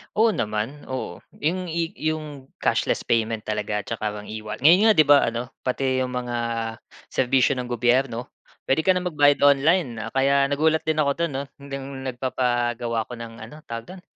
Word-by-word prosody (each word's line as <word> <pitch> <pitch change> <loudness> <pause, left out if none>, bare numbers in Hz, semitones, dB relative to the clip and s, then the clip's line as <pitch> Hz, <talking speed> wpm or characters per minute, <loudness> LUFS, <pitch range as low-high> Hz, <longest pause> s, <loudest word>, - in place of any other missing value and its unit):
Oo 220 +1 +4
naman, 110 - -3
oo. 130 -9 -5 0.2
'Yung 180 +3 0
i 165 0 -2 0.2
'yung 150 -4 -4 0.2
cashless - - +1
payment 115 -1 0
talaga 105 -1 -2
'tsaka 115 +3 -5
parang 105 0 -8
e-wa 110 0 -5
ngayon 180 - +6
nga - - +8
'di 155 - +7
ba 145 -1 +8
ano 120 +2 -3
pati 130 0 0
'yung 125 -1 -2
mga 125 -1 -3 0.8
serbisyo 130 +1 +2
ng 125 -1 -3
gobyerno 120 0 0 0.4
puwede 145 +4 +2
ka 185 - +5
na 185 - +2
magbayad 145 -5 +3
online. 140 -6 +2
Kaya 140 +1 +3
nagulat 160 +2 +2
din 155 0 0
ako 140 -2 +3
don 170 -2 -1
'no, 135 +1 -2 0.2
nung 135 -1 -7
nagpapagawa 120 -2 -1
ako 125 - -8
ng, 115 -1 -8
ano 110 +6 -10
tawag 115 0 -7
do'n, 180 - -13
130 Hz, 175 wpm, -24 LUFS, 115-150 Hz, 0.8 s, nga